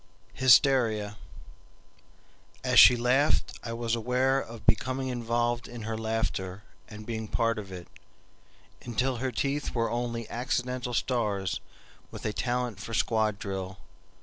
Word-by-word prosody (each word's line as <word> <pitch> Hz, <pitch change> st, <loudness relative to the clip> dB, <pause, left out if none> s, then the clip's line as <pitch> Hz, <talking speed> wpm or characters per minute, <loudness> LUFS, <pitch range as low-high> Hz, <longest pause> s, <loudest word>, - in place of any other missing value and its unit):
Hysteria 120 Hz, -5 st, +4 dB, 1.5 s
As -, -, +5 dB
she 125 Hz, -, +10 dB
laughed 125 Hz, +5 st, +1 dB
I 115 Hz, -, -4 dB
was 115 Hz, -1 st, -2 dB
aware 125 Hz, +3 st, +1 dB
of 115 Hz, -1 st, -10 dB
becoming 130 Hz, +3 st, +1 dB
involved 120 Hz, 0 st, -1 dB
in 120 Hz, -2 st, -8 dB
her 110 Hz, +1 st, -3 dB
laughter 110 Hz, -3 st, -2 dB, 0.2 s
and 105 Hz, 0 st, -10 dB
being 110 Hz, -1 st, -4 dB
part 115 Hz, +1 st, 0 dB
of 100 Hz, -2 st, -9 dB
it, 90 Hz, -2 st, -8 dB, 0.9 s
until 125 Hz, +2 st, -1 dB
her 130 Hz, +2 st, -2 dB
teeth 140 Hz, +2 st, -2 dB
were 115 Hz, -1 st, 0 dB
only 120 Hz, -1 st, -3 dB
accidental 125 Hz, 0 st, -2 dB
stars 100 Hz, -8 st, -1 dB, 0.5 s
with -, -, -9 dB
a 110 Hz, -, -1 dB
talent 120 Hz, -3 st, -2 dB
for 115 Hz, +2 st, -5 dB
squad 110 Hz, -2 st, +1 dB
drill. 95 Hz, -2 st, -5 dB
115 Hz, 130 wpm, -28 LUFS, 110-125 Hz, 1.5 s, she